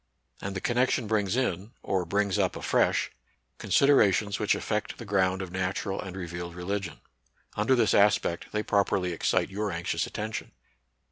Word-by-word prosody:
And 100 0 -4
the 95 - -3
connection 125 0 +1
brings 105 -1 0
in, 110 -4 -1
or 95 -2 0
brings 100 +2 0
up - - +1
afresh, - - +1 0.5
considerations 105 -7 +3
which 105 - +2
affect 105 -1 -3
the 115 - -8
ground 95 -2 +1
of 90 - -8
natural 95 +1 -2
and 95 0 -7
revealed 85 -1 -6
religion. 90 -1 -4 0.5
Under 110 +6 +3
this 110 -4 +3
aspect, 100 -4 +3
they 105 0 -1
properly 100 -3 +1
excite 90 +2 0
your 105 +1 -2
anxious 85 0 -2
atten 110 +1 -4
tion. - - -5
100 Hz, 155 wpm, -28 LUFS, 95-105 Hz, 0.5 s, considerations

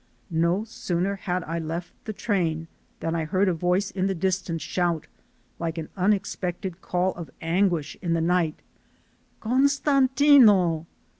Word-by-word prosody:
No 170 +5 +2
sooner 195 -3 -2
had 180 -2 -3
I 165 +2 -3
left 165 +2 -5
the 215 - -3
train 170 -7 -1 0.3
than 165 - -1
I 165 -1 -1
heard 190 +4 +1
a 185 - +2
voice 180 +4 0
in 190 0 -1
the 195 - -1
distance 180 -2 -1
shout, 175 -3 -1 0.5
like 165 0 -3
an 160 -1 -5
unexpected 190 -2 -1
call 180 +1 0
of 170 -2 -8
anguish 170 -2 0
in 170 -3 0
the 165 - +1
night: 165 -1 +1 0.8
"Costantino." 260 - +4
180 Hz, 140 wpm, -25 LUFS, 165-200 Hz, 0.8 s, Costantino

